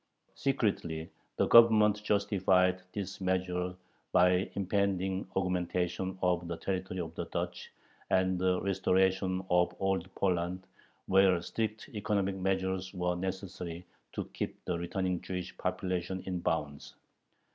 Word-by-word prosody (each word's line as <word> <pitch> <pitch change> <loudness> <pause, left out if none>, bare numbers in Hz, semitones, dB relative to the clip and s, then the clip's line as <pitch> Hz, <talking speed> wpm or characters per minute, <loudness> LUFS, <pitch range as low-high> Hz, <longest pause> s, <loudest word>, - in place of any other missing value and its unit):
Secretly 95 -11 -1 0.3
the - - +3
Government 110 -3 +7
justified 95 -3 +2
this 100 -2 -5
measure 90 -1 -1 0.4
by 90 0 +6
the 90 +1 +1
impending 95 -1 0
augmentation 90 0 -1
of 90 -1 +1
the 85 -1 -4
territory 95 0 -3
of 80 -2 -4
the - - -4
Duchy - - -4 0.4
and 95 -1 +2
the 90 0 +2
restoration 95 -1 +1
of 90 0 +3
Old 95 -2 0
Poland, 90 0 0 0.4
where 95 -2 +5
strict 110 -1 -3
economic 105 -2 0
measures 95 0 -1
were 90 0 0
necessary 90 -2 -5 0.3
to - - -3
keep - - -5
the 90 - -1
returning 90 0 -1
Jewish 90 -1 -5
population 90 0 -2
in 90 -2 -2
bounds. 75 -4 -2
95 Hz, 125 wpm, -31 LUFS, 90-95 Hz, 0.4 s, Government